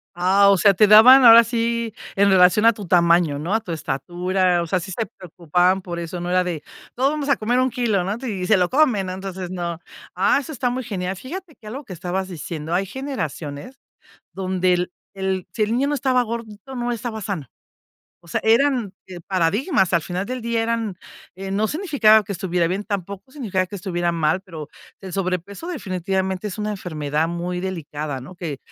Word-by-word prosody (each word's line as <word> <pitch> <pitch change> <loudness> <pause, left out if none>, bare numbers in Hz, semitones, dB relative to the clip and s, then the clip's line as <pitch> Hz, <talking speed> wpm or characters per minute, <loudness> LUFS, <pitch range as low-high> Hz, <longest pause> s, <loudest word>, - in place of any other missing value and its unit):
Ah, 195 +3 +4
o 195 - +5
sea, 200 +3 +5
te 210 +3 +5
daban 250 +6 +9
ahora 230 0 +10
sí 235 -1 -1 0.2
en 200 0 +4
relación 185 +3 +5
a 230 - +7
tu 205 -4 -9
tamaño, 170 -4 +3
¿no? 170 +7 -3
A 220 - +2
tu 180 - -7
estatura, 175 +4 0
o - - -6
sea, 185 +2 +1
sí 190 +3 -8
se 225 +5 -2
preocupaban 180 +1 0
por 175 -2 -6
eso, 170 +1 -5
no 175 +1 -4
era 180 0 +3
de 170 -4 -4 0.3
todos 270 +3 +2
vamos 295 -2 -3
a 275 - +3
comer 240 +4 0
un 255 0 +2
kilo, 225 -6 0
¿no? 200 +4 -2
Y 185 -4 -3
se 215 - +5
lo 180 -1 +1
comen, 255 -9 +2
no, 185 - -4
entonces 190 -1 -6
no. 170 -2 -4 0.4
Ah, 195 +9 +3
eso 300 +3 -7
está 250 -3 -1
muy 255 +1 -3
genial. 190 -4 -3
Fíjate 315 - -8
que 215 - -15
algo 270 +7 -6
que 185 - -8
estabas 185 +2 -3
diciendo, 165 -1 -6
hay 195 +2 +1
generaciones 195 - -6 0.5
donde 185 -1 0
el 180 0 -1 0.2
el 190 -1 -2
si 215 - 0
el 215 - -1
niño 270 +3 +1
no 295 - 0
estaba 255 -2 +2
gordito, 230 +2 -7
no 240 0 -2
estaba 225 -1 -5
sano. 185 - -4 0.8
O - - -18
sea, - - -2
eran, 235 -2 +2
eh, 180 -2 -9
paradigmas, 190 - +1
al 170 - +3
final 180 +4 -4
del 255 +1 -5
día 230 0 -1
eran, 225 -4 -2 0.4
eh, 195 0 -6
no 210 +2 +1
significaba 265 - +3
que 200 - -7
estuviera 180 -3 -1
bien, 190 +4 -2
tampoco 200 +3 -5
significaba 195 -10 -2
que 205 - -8
estuviera 175 -2 -2
mal, 165 +2 0
pero 160 -6 -9 0.3
el 190 -2 -9
sobrepeso 195 - -3
definitivamente 190 - -2
es 200 - -7
una 210 0 -2
enfermedad 155 -5 -2
muy 175 +1 -3
delicada, 150 -7 -5
¿no? 180 +8 -11
Que 160 -6 -5
190 Hz, 205 wpm, -22 LUFS, 175-230 Hz, 0.8 s, ahora